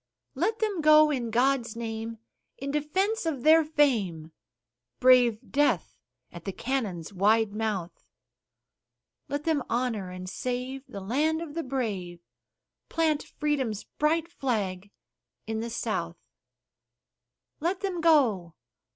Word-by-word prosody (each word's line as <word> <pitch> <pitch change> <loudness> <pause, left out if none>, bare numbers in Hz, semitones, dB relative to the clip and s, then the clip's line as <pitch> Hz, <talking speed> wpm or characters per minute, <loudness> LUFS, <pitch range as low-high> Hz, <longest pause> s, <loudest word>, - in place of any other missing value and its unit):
Let 370 +11 0
them 420 -6 -1
go, 305 0 +7
in 245 -5 -2
God's 240 0 +1
name, 225 0 -5 0.4
in 275 +1 -4
defense 360 +8 0
of 280 -7 -2
their 320 +1 +7
fame, 220 - +1 0.7
Brave 245 -3 +4
death 290 +1 +1 0.4
at - - -10
the 195 - -3
cannon's 205 -8 -3
wide 210 +2 +3
mouth; 210 -5 -3 1.3
Let 285 +1 -2
them 315 -3 +1
honor 230 -6 -1
and 185 0 -7
save 255 +6 -4
the 200 - -8
land 295 +10 +1
of 330 -3 -7
the 335 - -2
brave, 210 - -3 0.7
Plant 315 -3 +1
Freedom's 265 -8 -2
bright 320 +2 0
flag 205 - -2 0.6
in 220 0 -3
the 230 +1 -3
South. 175 -7 -3 1.4
Let 350 +4 -1
them 375 -4 -2
go! 230 - +3
255 Hz, 120 wpm, -28 LUFS, 215-300 Hz, 1.4 s, go